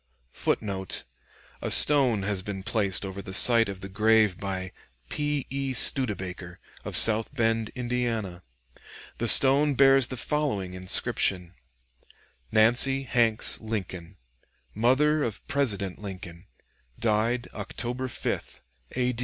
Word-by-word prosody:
[Footnote: 95 Hz, -, -3 dB, 0.6 s
A -, -, -4 dB
stone 130 Hz, -8 st, +6 dB
has 100 Hz, -1 st, -2 dB
been 95 Hz, 0 st, -7 dB
placed 100 Hz, -3 st, -1 dB
over 95 Hz, 0 st, -7 dB
the 95 Hz, -2 st, -7 dB
site 115 Hz, -3 st, +5 dB
of 95 Hz, -1 st, -8 dB
the 95 Hz, -, -7 dB
grave 105 Hz, -1 st, +1 dB
"by 95 Hz, -2 st, -5 dB, 0.4 s
P. 145 Hz, -2 st, -3 dB
E. 135 Hz, -1 st, -3 dB
Studebaker, 95 Hz, -9 st, -1 dB, 0.2 s
of -, -, -1 dB
South 110 Hz, 0 st, +4 dB
Bend, 115 Hz, -2 st, -1 dB
Indiana." 120 Hz, -7 st, -4 dB, 0.8 s
The 120 Hz, -, -2 dB
stone 140 Hz, +4 st, +5 dB
bears 135 Hz, -1 st, +4 dB
the 130 Hz, -, -7 dB
following 110 Hz, -10 st, -3 dB
inscription: 90 Hz, 0 st, -1 dB, 1.0 s
"Nancy 125 Hz, +5 st, +3 dB
Hanks 115 Hz, -3 st, +1 dB
Lincoln, 95 Hz, -5 st, -7 dB, 0.6 s
mother 140 Hz, +7 st, +1 dB
of 110 Hz, -5 st, -6 dB
President 100 Hz, -10 st, -2 dB
Lincoln, 90 Hz, -3 st, -10 dB, 0.5 s
died 115 Hz, +2 st, -1 dB
October 125 Hz, +2 st, -5 dB
5th, 125 Hz, -, -5 dB, 0.3 s
A. 125 Hz, 0 st, -1 dB
110 Hz, 115 wpm, -25 LUFS, 95-125 Hz, 1.0 s, stone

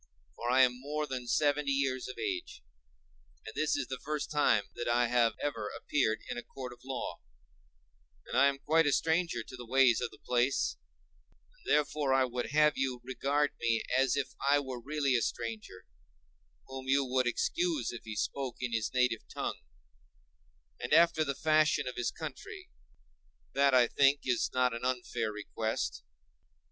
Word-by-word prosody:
For 120 Hz, -, -4 dB
I 130 Hz, +1 st, +6 dB
am 125 Hz, 0 st, +1 dB
more 150 Hz, +2 st, -2 dB
than 130 Hz, -3 st, -5 dB
seventy 145 Hz, +2 st, +2 dB
years 135 Hz, -2 st, 0 dB
of 130 Hz, -, -8 dB
age, 365 Hz, -, -4 dB, 0.8 s
and 110 Hz, -, -7 dB
this 155 Hz, 0 st, +1 dB
is 140 Hz, -, -1 dB
the 130 Hz, 0 st, -6 dB
first 150 Hz, -1 st, -3 dB
time 115 Hz, -8 st, +3 dB
that 120 Hz, -, -5 dB
I 120 Hz, +1 st, +3 dB
have 120 Hz, -2 st, +3 dB
ever 110 Hz, -8 st, -3 dB
appeared 110 Hz, -6 st, 0 dB
in -, -, -4 dB
a -, -, -6 dB
court 125 Hz, 0 st, -8 dB
of 120 Hz, -, -17 dB
law, 130 Hz, -9 st, -5 dB, 1.1 s
and -, -, -6 dB
I 135 Hz, +2 st, +6 dB
am 140 Hz, -1 st, 0 dB
quite 160 Hz, +3 st, +2 dB
a -, -, +3 dB
stranger 165 Hz, -7 st, +1 dB
to 130 Hz, -, -10 dB
the 125 Hz, -, -8 dB
ways 125 Hz, 0 st, +4 dB
of -, -, -1 dB
the -, -, -16 dB
place; 125 Hz, +2 st, 0 dB, 0.8 s
and -, -, -7 dB
therefore 145 Hz, -2 st, +2 dB
I 135 Hz, -1 st, +4 dB
would 125 Hz, 0 st, -3 dB
have 150 Hz, +1 st, +3 dB
you 130 Hz, -2 st, -1 dB
regard 140 Hz, +3 st, 0 dB
me 115 Hz, -1 st, +1 dB
as 130 Hz, 0 st, +3 dB
if 135 Hz, -2 st, -2 dB
I 140 Hz, +1 st, +4 dB
were 130 Hz, -3 st, -6 dB
really 140 Hz, 0 st, 0 dB
a 120 Hz, -, +2 dB
stranger, 110 Hz, -6 st, -5 dB, 0.8 s
whom 130 Hz, 0 st, -8 dB
you 135 Hz, +1 st, +3 dB
would 130 Hz, 0 st, +1 dB
excuse 330 Hz, -, 0 dB
if 120 Hz, -, -8 dB
he 110 Hz, -1 st, -7 dB
spoke 130 Hz, +3 st, -2 dB
in 125 Hz, -2 st, -3 dB
his 110 Hz, -2 st, -1 dB
native 125 Hz, -3 st, +1 dB
tongue, -, -, -3 dB, 1.2 s
and 120 Hz, -, -3 dB
after 165 Hz, -1 st, +5 dB
the 140 Hz, -2 st, -2 dB
fashion 155 Hz, -2 st, +2 dB
of 125 Hz, -, -4 dB
his 120 Hz, -1 st, 0 dB
country: 165 Hz, -, -8 dB, 0.8 s
that 140 Hz, -1 st, +4 dB
I 125 Hz, -1 st, +6 dB
think 140 Hz, +2 st, +3 dB
is 125 Hz, -2 st, +1 dB
not 125 Hz, -1 st, +2 dB
an 115 Hz, -, -6 dB
unfair 120 Hz, -3 st, -1 dB
request. 105 Hz, -, -3 dB
130 Hz, 175 wpm, -31 LUFS, 120-145 Hz, 1.2 s, I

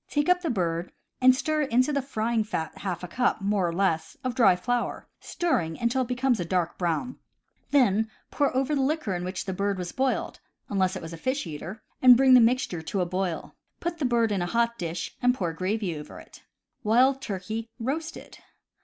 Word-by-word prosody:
Take 295 Hz, +2 st, 0 dB
up 360 Hz, 0 st, +4 dB
the 335 Hz, -, -2 dB
bird, 175 Hz, -6 st, -1 dB, 0.3 s
and 255 Hz, 0 st, +7 dB
stir 305 Hz, +2 st, 0 dB
into 255 Hz, +1 st, +2 dB
the 280 Hz, -, +1 dB
frying 230 Hz, -3 st, -1 dB
fat 160 Hz, -7 st, -4 dB
half 180 Hz, -3 st, -4 dB
a -, -, -4 dB
cup, 245 Hz, +7 st, 0 dB
more 200 Hz, -2 st, +1 dB
or -, -, -1 dB
less, 165 Hz, -3 st, 0 dB
of 255 Hz, -1 st, -1 dB
dry 225 Hz, -8 st, +5 dB
flour, 245 Hz, +6 st, -2 dB
stirring 175 Hz, -, -1 dB
until 235 Hz, +3 st, +1 dB
it 250 Hz, -, -2 dB
becomes 250 Hz, -1 st, +1 dB
a -, -, 0 dB
dark 175 Hz, -1 st, -1 dB
brown; 175 Hz, +8 st, -1 dB, 0.5 s
then 220 Hz, -6 st, +3 dB, 0.2 s
pour 285 Hz, -2 st, +1 dB
over 270 Hz, +3 st, +1 dB
it -, -, +2 dB
the -, -, +1 dB
liquor 275 Hz, -7 st, 0 dB
in 175 Hz, 0 st, -3 dB
which 185 Hz, +1 st, -4 dB
the 190 Hz, -, -3 dB
bird 200 Hz, +1 st, -1 dB
was 180 Hz, -1 st, -4 dB
boiled 265 Hz, 0 st, -1 dB, 0.3 s
(unless 190 Hz, -1 st, +1 dB
it 185 Hz, -, -6 dB
was 165 Hz, +1 st, -7 dB
a -, -, -7 dB
fish 260 Hz, -, -2 dB
eater), 170 Hz, +7 st, -7 dB, 0.2 s
and 250 Hz, -2 st, +9 dB
bring 265 Hz, 0 st, +6 dB
the 250 Hz, -, +9 dB
mixture 230 Hz, -7 st, +1 dB
to 185 Hz, +4 st, -2 dB
a -, -, +1 dB
boil. 185 Hz, -1 st, -3 dB, 0.3 s
Put 340 Hz, -1 st, -3 dB
the 290 Hz, -, 0 dB
bird 235 Hz, -3 st, +2 dB
in 195 Hz, -3 st, 0 dB
a 175 Hz, -, -1 dB
hot 235 Hz, +3 st, +1 dB
dish, 165 Hz, -1 st, -4 dB
and 250 Hz, 0 st, +3 dB
pour 175 Hz, -8 st, -2 dB
gravy 185 Hz, +1 st, -2 dB
over 150 Hz, 0 st, -9 dB
it. -, -, -15 dB, 0.4 s
Wild 255 Hz, +5 st, +4 dB
Turkey, 220 Hz, +1 st, -4 dB
Roasted. 295 Hz, +8 st, -5 dB
220 Hz, 210 wpm, -26 LUFS, 180-255 Hz, 0.5 s, and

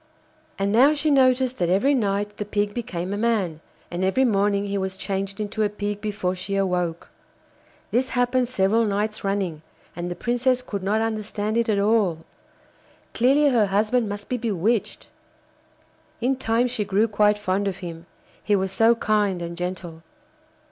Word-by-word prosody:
And 195 Hz, +1 st, 0 dB
now 265 Hz, +8 st, +5 dB
she 300 Hz, +1 st, +1 dB
noticed 255 Hz, -2 st, +3 dB
that 175 Hz, -2 st, +1 dB
every 200 Hz, +11 st, +3 dB
night 205 Hz, -4 st, -1 dB
the -, -, -2 dB
Pig 205 Hz, 0 st, -1 dB
became 190 Hz, -5 st, -4 dB
a -, -, -2 dB
man, 205 Hz, -8 st, 0 dB, 0.3 s
and 175 Hz, +2 st, -2 dB
every 190 Hz, +8 st, +2 dB
morning 200 Hz, -2 st, +1 dB
he 200 Hz, 0 st, -3 dB
was 190 Hz, 0 st, -3 dB
changed 195 Hz, 0 st, -3 dB
into 210 Hz, +1 st, -3 dB
a 210 Hz, -, +2 dB
Pig 205 Hz, 0 st, -4 dB
before 205 Hz, -4 st, -2 dB
she 185 Hz, +2 st, -4 dB
awoke. 180 Hz, -3 st, -1 dB, 0.8 s
This 255 Hz, +3 st, +1 dB
happened 245 Hz, 0 st, +2 dB
several 220 Hz, -1 st, +2 dB
nights 210 Hz, 0 st, -1 dB
running, 195 Hz, -6 st, -2 dB, 0.3 s
and 175 Hz, +1 st, -4 dB
the 175 Hz, -, -4 dB
Princess 245 Hz, +4 st, 0 dB
could 200 Hz, -5 st, -5 dB
not 205 Hz, +3 st, +1 dB
understand 215 Hz, -1 st, -2 dB
it 235 Hz, 0 st, +1 dB
at 210 Hz, -, +2 dB
all. 200 Hz, -6 st, +1 dB, 0.9 s
Clearly 280 Hz, +5 st, +4 dB
her 230 Hz, -6 st, +3 dB
husband 215 Hz, +3 st, +1 dB
must 205 Hz, 0 st, -6 dB
be 250 Hz, -, -1 dB
bewitched. 220 Hz, -1 st, -1 dB, 1.1 s
In 255 Hz, +3 st, +1 dB
time 230 Hz, -1 st, +1 dB
she 245 Hz, -3 st, -2 dB
grew 205 Hz, +2 st, +2 dB
quite 210 Hz, -1 st, +3 dB
fond 200 Hz, 0 st, -1 dB
of 190 Hz, -2 st, -3 dB
him, 165 Hz, 0 st, -8 dB, 0.4 s
he 205 Hz, -, +2 dB
was 190 Hz, -1 st, -1 dB
so 225 Hz, +3 st, +4 dB
kind 210 Hz, -4 st, +1 dB
and 170 Hz, 0 st, -5 dB
gentle. 180 Hz, -2 st, -5 dB
205 Hz, 170 wpm, -24 LUFS, 190-230 Hz, 1.1 s, now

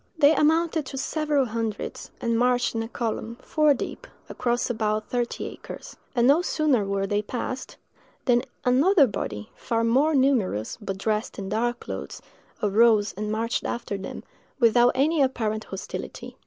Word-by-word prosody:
They 300 Hz, 0 st, +6 dB
amounted 320 Hz, -1 st, +2 dB
to 270 Hz, -, -6 dB
several 295 Hz, 0 st, +1 dB
hundreds, 225 Hz, -2 st, -4 dB
and 230 Hz, 0 st, 0 dB
marched 245 Hz, +1 st, +2 dB
in 225 Hz, -, -1 dB
a 225 Hz, -, -4 dB
column, 230 Hz, 0 st, -3 dB
four 305 Hz, -2 st, +3 dB
deep, -, -, -6 dB, 0.2 s
across 240 Hz, 0 st, 0 dB
about 215 Hz, -2 st, -1 dB
thirty 240 Hz, -1 st, -1 dB
acres; -, -, -9 dB, 0.2 s
and 240 Hz, 0 st, +4 dB
no 290 Hz, +5 st, +5 dB
sooner 305 Hz, -, +1 dB
were 195 Hz, 0 st, -1 dB
they 205 Hz, +1 st, 0 dB
passed, 250 Hz, +4 st, -5 dB, 0.5 s
than 245 Hz, -2 st, +4 dB, 0.2 s
another 285 Hz, +6 st, +5 dB
body, 105 Hz, -, -5 dB
far 230 Hz, -2 st, -1 dB
more 275 Hz, +7 st, +3 dB
numerous, 240 Hz, -, +1 dB
but 195 Hz, -2 st, -4 dB
dressed 215 Hz, +2 st, -2 dB
in 195 Hz, -1 st, -5 dB
dark 240 Hz, +3 st, -1 dB
clothes, 95 Hz, -8 st, -6 dB, 0.4 s
arose 215 Hz, 0 st, +4 dB
and 210 Hz, +2 st, -4 dB
marched 225 Hz, +2 st, -1 dB
after 235 Hz, -3 st, -3 dB
them, 195 Hz, -1 st, -7 dB, 0.4 s
without 240 Hz, +1 st, +5 dB
any 295 Hz, +4 st, +2 dB
apparent 220 Hz, -5 st, 0 dB
hostility. 195 Hz, 0 st, -7 dB
235 Hz, 155 wpm, -25 LUFS, 215-270 Hz, 0.5 s, They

